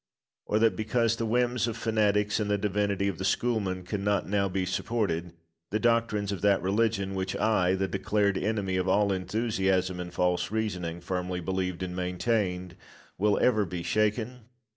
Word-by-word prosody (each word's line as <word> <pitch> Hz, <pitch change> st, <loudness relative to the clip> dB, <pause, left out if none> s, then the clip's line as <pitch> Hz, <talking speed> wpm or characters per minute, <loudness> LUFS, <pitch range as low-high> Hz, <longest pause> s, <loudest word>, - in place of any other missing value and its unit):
Or 105 Hz, -, +1 dB
that, 110 Hz, -3 st, +3 dB
because 115 Hz, +2 st, +1 dB
the 115 Hz, -, -1 dB
whims 120 Hz, +1 st, +1 dB
of 115 Hz, -1 st, -3 dB
fanatics 105 Hz, -2 st, +1 dB
and 105 Hz, -1 st, -1 dB
the 105 Hz, -, +2 dB
divinity 100 Hz, -1 st, 0 dB
of 95 Hz, -4 st, -3 dB
the -, -, -3 dB
schoolmen 95 Hz, -2 st, 0 dB
cannot 100 Hz, +1 st, -1 dB
now 100 Hz, -1 st, +1 dB
be 95 Hz, 0 st, -1 dB
supported, 90 Hz, -3 st, -1 dB, 0.4 s
the 110 Hz, -, 0 dB
doctrines 115 Hz, -3 st, +1 dB
of 95 Hz, -4 st, -4 dB
that 100 Hz, -1 st, +4 dB
religion 100 Hz, 0 st, +1 dB
which 95 Hz, 0 st, -2 dB
I, 95 Hz, -4 st, +2 dB
the 95 Hz, 0 st, 0 dB
declared 100 Hz, +1 st, +1 dB
enemy 100 Hz, -3 st, -1 dB
of 90 Hz, 0 st, 0 dB
all 100 Hz, +2 st, +3 dB
enthusiasm 95 Hz, -2 st, 0 dB
and 90 Hz, 0 st, -5 dB
false 90 Hz, 0 st, 0 dB
reasoning, 90 Hz, -6 st, -3 dB
firmly 90 Hz, 0 st, -3 dB
believed 95 Hz, 0 st, -2 dB
and 90 Hz, -1 st, -4 dB
maintained, 90 Hz, 0 st, -1 dB, 0.4 s
will 105 Hz, +1 st, +3 dB
ever 110 Hz, -4 st, +4 dB
be 90 Hz, -2 st, -5 dB
shaken? 110 Hz, +5 st, 0 dB
100 Hz, 165 wpm, -28 LUFS, 90-110 Hz, 0.4 s, that